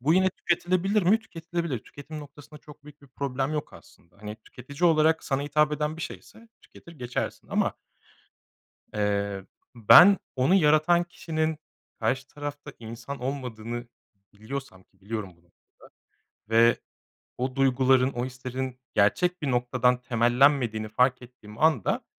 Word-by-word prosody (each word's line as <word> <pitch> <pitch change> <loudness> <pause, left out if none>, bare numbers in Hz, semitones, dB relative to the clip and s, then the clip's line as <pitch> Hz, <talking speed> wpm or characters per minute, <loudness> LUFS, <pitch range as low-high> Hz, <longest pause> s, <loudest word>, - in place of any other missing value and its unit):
Bu 150 +6 +3
yine 185 0 +3
tüketilebilir 185 +4 0
mi? 195 +6 +4
Tüketilebilir. 170 - -4
Tüketim 145 +7 -10
noktasında 145 +1 -13
çok 150 -1 -16
büyük 150 0 -15
bir 140 - -16
problem 135 +1 -3
yok 150 -1 -4
aslında. 85 +1 -18
Hani, 105 +1 -8
tüketici 140 +7 -1
olarak 160 0 +2
sana 135 0 -1
hitap 150 +1 +2
eden 150 +1 -2
bir 165 - -6
şeyse 230 +6 -10
tüketir 170 - -16
geçersin. 125 -6 -5
Ama - - 0 1.2
eee, 100 -2 -1 0.3
ben 175 - +8 0.2
onu 130 +8 +3
yaratan 165 0 +4
kişinin 160 -2 -3 0.4
karşı 135 0 -1
tarafta 145 0 -7
insan 115 +4 -8
olmadığını 120 -3 -5 0.4
biliyorsam 110 -1 -8
ki 95 0 -35
biliyorum 105 -1 -5
bunu 85 - -29
burada 85 - -32 1.0
ve 115 +1 +5 0.6
o 130 +2 -3
duyguların, 130 0 +3
o 120 0 -3
hislerin 130 0 -6
gerçek 175 - +2
bir 140 - -1
noktadan 125 0 +1
temellenmediğini 120 -1 +2
fark 125 +4 +2
ettiğim 115 -3 -14
anda, 155 - +2
135 Hz, 135 wpm, -26 LUFS, 120-155 Hz, 1.2 s, ben